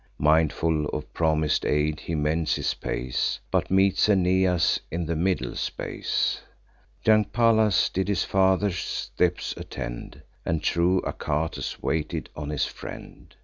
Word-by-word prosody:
Mindful 80 0 +2
of 75 +1 -5
promis'd 80 -2 +1
aid, 75 +1 +1
he 85 - -4
mends 75 +1 +1
his - - -1
pace, 60 +1 -2
But - - +1
meets 95 +1 +3
Aeneas 90 -2 +3
in 85 +2 -3
the 85 +1 -2
middle 85 -7 0
space. - - -2 0.6
Young 110 -1 +5
Pallas 110 -3 +3
did 95 +1 -2
his 100 -3 +1
father's 95 0 +2
steps - - -1
attend, - - -7 0.2
And 80 -3 -1
true 90 +2 +2
Achates 80 +2 -3
waited 80 -2 -2
on 75 -1 -5
his 75 -2 0
friend. - - -10
85 Hz, 130 wpm, -26 LUFS, 75-95 Hz, 0.6 s, Young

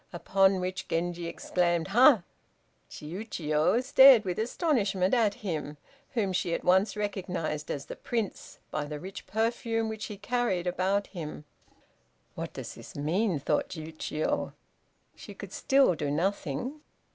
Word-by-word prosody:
Upon 190 +1 +2
which 185 0 -4
Genji 175 0 -2
exclaimed 175 0 0
"Ha!" 240 - +6 0.7
Chiûjiô 160 +3 -1
stared 265 -4 +8
with 180 0 -2
astonishment 220 - +1
at 225 -5 +3
him, 150 -4 -3 0.4
whom 200 -5 0
she 175 -1 0
at - - -5
once 190 +3 +3
recognized 180 -7 -3
as 140 -1 -3
the - - -7
Prince, 225 -5 -4
by 150 -1 -2
the 150 0 -6
rich 190 +4 -9
perfume 225 0 0
which 220 -1 -5
he 210 - -7
carried 235 -5 -1
about 190 +3 0
him. 155 -4 -7 0.9
"What - - -6
does - - -7
this - - -12
mean?" 170 +6 0
thought 140 - 0
Chiûjiô. 155 -1 -3 0.6
She - - -11
could - - -9
still 270 -7 +4
do 150 -3 -3
nothing. 185 - -2
185 Hz, 135 wpm, -29 LUFS, 165-220 Hz, 0.9 s, stared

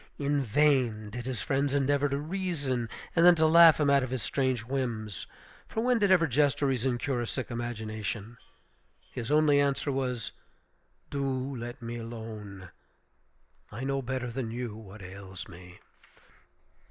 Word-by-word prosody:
In 145 0 +1
vain 120 -4 +2
did 120 +3 -6
his 130 -3 -3
friends 140 +1 0
endeavor 140 +1 +2
to 140 - -1
reason, 145 -7 -2 0.3
and 170 - +4
then 175 0 +8
to 160 -1 +3
laugh 165 0 +8
him 145 -2 +3
out 140 -1 +5
of 130 - -3
his 130 -4 -3
strange 130 -4 0
whims; 115 - -3 0.4
for 220 - -2
when 245 0 +2
did 205 -2 +3
ever 180 -3 +5
jest 145 0 +2
or - - +4
reason 130 -2 +1
cure 130 -1 -1
a 120 - -3
sick 130 +1 -4
imagination? 110 -2 -4 0.8
His 120 0 -5
only 150 -1 +4
answer 140 +1 0
was, 125 -4 -2 0.8
"Do 135 -1 -2
let 120 0 -7
me 115 +1 -4
alone; 110 -5 -8 1.0
I 115 +5 -6
know 135 0 0
better 130 -1 -3
than 120 -1 -3
you 120 -2 -4
what 105 -2 -11
ails 95 0 -8
me." 90 0 -13
130 Hz, 160 wpm, -29 LUFS, 115-140 Hz, 1.0 s, then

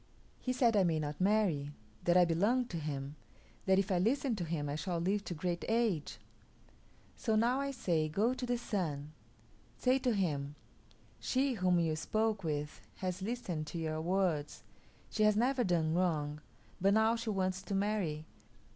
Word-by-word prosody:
He 255 - -2
said 240 -3 +3
I 200 - +5
may 165 -3 +1
not 150 +2 -4
marry; 185 -8 +2 0.4
that 175 +1 +5
I 180 - +7
belong 205 +10 +2
to 170 - -4
him; 145 -1 -4 0.5
that 190 0 +5
if 195 +1 +1
I 180 - +3
listen 250 +5 +1
to 180 - -2
him 155 -3 -2
I 145 - -2
shall 175 +3 -2
live 195 +5 0
to 175 - -4
great 175 +2 -2
age. 225 -9 0 1.0
So 220 -3 0
now 240 +4 +3
I 280 - -1
say, 170 - 0
go 210 +10 +2
to 255 - -4
the 245 0 +1
Sun; 155 -11 -3 0.7
say 255 +1 +3
to 250 -4 +1
him, 145 -7 -1 0.6
'She 265 +1 +1
whom 180 -5 +2
you 160 -2 +1
spoke 215 +5 0
with 150 -1 -3
has 185 -1 -3
listened 190 -8 -3
to 170 - -5
your 160 -1 -2
words; 175 -4 0 0.5
she 215 - -2
has 215 -1 +5
never 250 +2 +2
done 165 -5 +1
wrong, 150 -4 0 0.4
but 195 +2 +4
now 220 +1 +4
she 230 -1 -4
wants 190 -2 0
to 200 - -4
marry. 195 -7 -1
185 Hz, 175 wpm, -33 LUFS, 155-220 Hz, 1.0 s, I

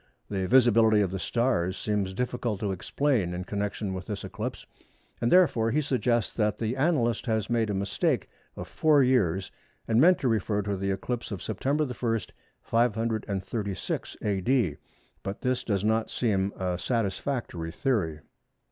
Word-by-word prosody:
The 95 -2 -1
visibility 115 -3 +5
of 95 -3 0
the 95 - -3
stars 100 -6 0
seems 100 -3 -1
difficult 120 -3 -2
to 105 -2 0
explain 100 -1 0
in 90 - -4
connection 100 0 -3
with 95 -1 -6
this 105 -2 -4
eclipse, - - -5 0.6
and 120 - +1
therefore 150 -11 +4
he 145 - +2
suggests 125 -5 0
that 105 -2 +1
the 115 0 -1
annalist 130 -6 +1
has 110 -1 0
made 115 -2 +1
a 100 - -1
mistake 100 0 0 0.3
of - - -7
four 150 -3 +4
years 95 -8 +2 0.4
and 115 +1 +4
meant 180 +3 +6
to 130 - +1
refer 105 -2 +1
to 100 0 -1
the 95 +1 -2
eclipse 115 +5 -3
of 100 -5 -5
September 140 +8 0
1, 120 -3 -1 0.4
536 110 -3 -1
A.D., 105 - +1 0.4
but 100 +1 -5
this 125 0 0
does 100 -3 -1
not 110 +1 +1
seem 100 -5 0
a 90 -1 -2
satisfactory 105 -4 -2
theory. 85 - -1
110 Hz, 155 wpm, -28 LUFS, 95-125 Hz, 0.6 s, meant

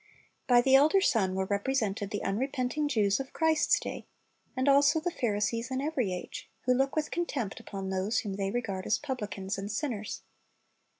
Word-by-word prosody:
By 245 -2 +6
the 265 +2 +2
elder 300 +8 +6
son 200 - +2
were 190 0 0
represented 205 -1 -1
the 205 - -4
unrepenting 255 +7 -1
Jews 210 -6 +2
of 270 0 -6
Christ's 320 -1 +3
day, - - -6 0.5
and 260 +2 0
also 280 +3 +5
the 350 +3 -2
Pharisees 230 -1 -1
in 260 0 -2
every 270 -8 -1
age, 180 -1 -6
who 250 - +2
look 270 +2 +1
with 310 -1 -1
contempt 280 - -2
upon 195 -1 -6
those 190 +4 0
whom 205 -5 -4
they 195 0 -2
regard 200 -4 -3
as 215 - +3
publicans 210 -8 -4
and 200 +2 -4
sinners. 220 -3 -3
240 Hz, 175 wpm, -29 LUFS, 200-275 Hz, 0.5 s, By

